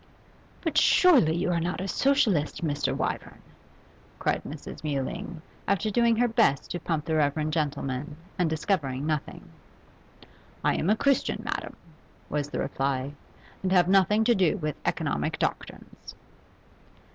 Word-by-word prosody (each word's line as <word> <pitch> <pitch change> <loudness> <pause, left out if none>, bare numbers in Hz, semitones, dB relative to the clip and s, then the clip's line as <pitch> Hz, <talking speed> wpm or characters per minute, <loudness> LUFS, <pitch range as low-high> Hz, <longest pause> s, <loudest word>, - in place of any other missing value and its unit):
'But 315 -3 +2
surely 270 - +5
you 180 +1 0
are 170 - +1
not 170 +2 -2
a 190 - -3
Socialist, 210 - +1
Mr. 145 -1 -1
Wyvern?' - - -4 0.7
cried - - 0
Mrs. - - -8
Mewling, 155 +4 -4 0.2
after 200 +2 +1
doing 235 +1 +3
her 245 +2 +3
best 225 - +2
to 175 - -3
pump 160 -3 -2
the 160 - -2
reverend 155 +1 +1
gentleman, 145 -1 -2 0.2
and 175 -3 +2
discovering 150 -5 -1
nothing. 155 -2 -3 1.2
'I - - +2
am 165 - 0
a 215 - +5
Christian, 280 +1 +1
madam,' - - -4 0.5
was 145 -1 -2
the - - -4
reply, 135 0 -2 0.5
'and 185 - -1
have 180 -2 +5
nothing 195 +3 +4
to 240 +2 +4
do 190 -2 +2
with 155 -5 -3
economic - - -1
doctrines. - - -5
170 Hz, 140 wpm, -27 LUFS, 150-205 Hz, 1.2 s, surely